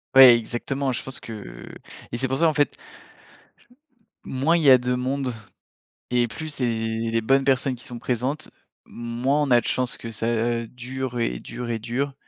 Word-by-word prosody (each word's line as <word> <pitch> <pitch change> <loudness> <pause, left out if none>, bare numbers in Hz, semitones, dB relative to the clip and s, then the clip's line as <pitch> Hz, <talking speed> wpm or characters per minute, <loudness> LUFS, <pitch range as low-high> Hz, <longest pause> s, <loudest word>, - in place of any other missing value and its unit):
Ouais, 130 -2 +11
exactement, 130 +4 -2
je - - -3
pense 135 0 -3
que - - -9 0.4
et 120 - -3
c'est 130 +2 +1
pour 135 +1 -1
ça, 165 - +4
en 160 - +2
fait 145 -1 +1 1.5
moins 140 +6 +1
il 165 - 0
y 140 - +7
a 130 - +9
de 125 0 -1
monde 130 +1 -1 0.8
et 120 -1 +3
plus, 155 +8 -7
c'est 130 -4 0
les 115 0 -1
bonnes 135 +4 +3
personnes 130 -1 +2
qui 120 - -10
sont 120 -1 -7
présentes, 130 +6 -2 0.3
moins 120 +5 -1
on 145 - -1
a 120 - +7
de - - -8
chances 125 -1 0
que 115 - -7
ça 115 +1 -1
dure 125 +1 -5
et 60 - -1
dure 120 - -6
et 115 - -1
dure 130 +5 -2
125 Hz, 185 wpm, -24 LUFS, 115-135 Hz, 1.5 s, Ouais